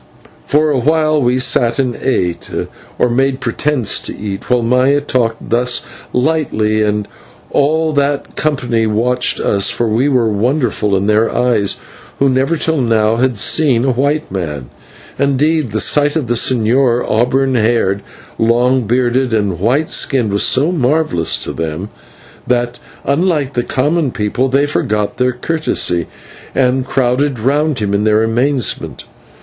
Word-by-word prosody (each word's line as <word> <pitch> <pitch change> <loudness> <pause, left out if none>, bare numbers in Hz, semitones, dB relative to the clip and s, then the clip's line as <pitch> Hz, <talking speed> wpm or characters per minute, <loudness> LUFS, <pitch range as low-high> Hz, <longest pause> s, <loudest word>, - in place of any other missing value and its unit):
For 150 +1 +2
a 135 - +1
while 155 +2 +2
we 125 0 +1
sat 120 -2 +2
and 125 -3 -1
ate, 90 -10 -2 0.5
or - - +2
made 130 +2 0
pretence 125 0 0
to - - -7
eat, 100 -2 -6
while 125 -1 +2
Maya 125 +4 +3
talked 120 -5 -2
thus 120 +1 +1 0.3
lightly 125 -7 0
and 105 -1 -1 0.4
all 155 +2 +1
that 140 0 -1
company 125 -7 0
watched 120 +4 0
us, 100 0 +1
for 120 - -1
we 120 +6 +1
were 125 -4 +2
wonderful 110 -1 0
in 95 - -1
their 110 +2 +2
eyes, 120 -5 +1 0.4
who 140 - +2
never 135 +6 +1
till 160 -1 0
now 115 -2 +2
had 125 -1 0
seen 130 +2 +2
a 135 - +2
white 140 +3 -1
man. 75 -9 -5 0.5
Indeed, 140 +1 +1
the 110 +1 -2
sight 145 +6 +2
of 155 -5 0
the 120 - -1
señor, 120 +1 +2
auburn 130 +4 +1
haired, 110 -4 +1 0.4
long 120 +1 +2
bearded, 125 +1 +1
and 100 -5 -1
white 130 - +1
skinned, 120 -7 0
was 100 - +1
so 145 +7 +2
marvellous 140 - +1
to - - -4
them, 80 +5 -4 0.6
that, 120 0 -1 0.3
unlike 145 -2 0
the 120 - 0
common 145 +5 0
people, 120 +4 -1
they 140 +2 +2
forgot 105 -8 -2
their 125 0 +1
courtesy 125 - -1 0.5
and 130 0 +1
crowded 130 +2 0
round 145 +5 0
him 105 -2 -2
in 100 +1 +1
their 110 0 +3
amazement. 125 +3 -1
125 Hz, 150 wpm, -15 LUFS, 110-140 Hz, 0.6 s, Maya